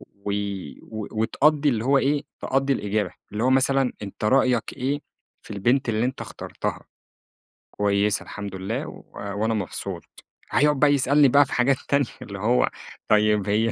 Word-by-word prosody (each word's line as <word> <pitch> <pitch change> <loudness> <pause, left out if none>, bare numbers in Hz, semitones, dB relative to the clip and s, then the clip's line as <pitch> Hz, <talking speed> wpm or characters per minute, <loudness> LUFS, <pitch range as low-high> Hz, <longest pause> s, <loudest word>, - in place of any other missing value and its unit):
و 100 +11 -9 0.5
و 110 -2 -6
وتقضّي 145 +7 +2
اللي 115 -4 0
هو 135 +2 +4
إيه 145 +2 +1 0.2
تقضّي 135 +1 +1
الإجابة، 105 -5 -1 0.2
اللي 105 +2 -2
هو 130 - +3
مثلًا 135 0 +3
أنت 100 +1 -7
رأيك 125 0 +2
إيه 140 +3 -1 0.4
في - - -16
البنت 120 +6 +1
اللي 110 0 +1
أنت 130 - -4
اخترتها؟ - - -5 0.9
كويسة 100 0 +1
الحمد 100 -2 -7
لله 95 +1 -3
و - - -11
وأنا 100 +3 -2
مبسوط، 100 -4 -4 0.5
هيقعد 150 -1 +3
بقى 145 0 +5
يسألني 140 +1 +4
بقى 140 +2 +5
في - - -7
حاجات 130 +2 +3
تانية 140 0 +3 0.2
اللي 100 -1 -7
هو 120 +5 +2 0.4
طيّب 105 -2 +3
هي 110 +2 +2
120 Hz, 160 wpm, -24 LUFS, 105-135 Hz, 0.9 s, بقى